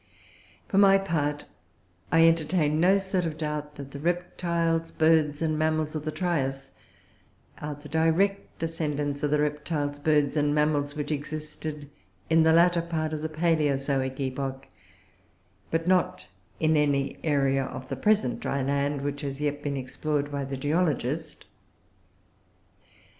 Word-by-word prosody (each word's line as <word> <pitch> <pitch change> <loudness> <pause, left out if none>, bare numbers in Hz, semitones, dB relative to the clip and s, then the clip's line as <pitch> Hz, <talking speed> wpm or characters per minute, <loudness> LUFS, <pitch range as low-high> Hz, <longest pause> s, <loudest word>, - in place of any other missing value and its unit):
For 195 - +2
my 195 -1 +7
part, 150 -6 -1 0.7
I 165 0 +6
entertain 160 -1 +2
no 185 +4 +5
sort 190 -2 -1
of 160 -2 -3
doubt 150 -1 -4
that 140 -1 -9
the 140 - -7
Reptiles, 170 0 -1
Birds, 155 -1 +2
and 155 -1 0
Mammals 155 -1 0
of 155 -1 -4
the 155 - -1
Trias 135 -7 -2 0.9
are 150 0 -4
the 145 +1 -12
direct 165 +6 +1
descendants 150 -3 -2
of 145 -2 0
Reptiles, 150 -1 -1
Birds, 150 -1 +2
and 145 -1 +2
Mammals 150 -1 +1
which 150 0 -3
existed 150 0 -5 0.4
in 165 0 +6
the 160 0 +5
latter 170 +1 +5
part 160 -2 -2
of 155 - -3
the 160 - -3
Palaeozoic 140 -5 0
epoch, 135 0 -4 1.0
but 165 +1 -1
not 180 -4 +1 0.3
in 160 0 +3
any 140 -2 +1
area 135 -3 +2
of 130 0 -7
the 135 - -2
present 135 - +1
dry 140 -1 -2
land 140 +1 0
which 145 0 -3
has 140 -1 -4
yet 145 -1 -1
been 145 -1 -2
explored 145 +2 -2
by 140 -1 -2
the 135 0 -4
geologist. 150 0 -1
150 Hz, 140 wpm, -27 LUFS, 145-165 Hz, 1.0 s, my